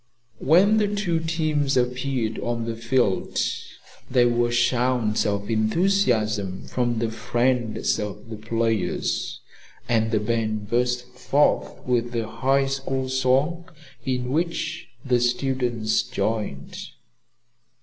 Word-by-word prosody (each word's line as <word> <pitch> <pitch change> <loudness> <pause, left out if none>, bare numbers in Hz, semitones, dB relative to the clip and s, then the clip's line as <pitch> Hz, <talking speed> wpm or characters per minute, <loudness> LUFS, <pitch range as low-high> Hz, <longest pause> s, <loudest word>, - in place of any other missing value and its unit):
When 190 +8 +5
the 210 -1 +3
two 200 -5 0
teams 155 -4 0
appeared 125 -2 -1
on 120 -1 -2
the 115 0 -3
field 115 -3 0 0.7
there 125 -1 +4
were 120 0 +1
shouts 120 -2 +1
of 100 0 -2
enthusiasm 110 - +1
from 120 -2 -1
the 115 0 -1
friends 120 0 0
of 105 +2 -6
the - - -4
players, 115 0 -1 0.5
and 110 -1 +2
the 110 -1 +1
band 110 -1 -2
burst 125 +1 +1
forth 130 +3 0
with 120 -1 0
the 115 -2 -1
High 135 +4 +1
School 135 -1 -2
song, 135 +7 +1 0.3
in 125 -1 -2
which 170 +3 -2 0.2
the 125 -2 +3
students 120 -3 0
joined. 105 -11 -3
120 Hz, 115 wpm, -24 LUFS, 115-135 Hz, 0.7 s, When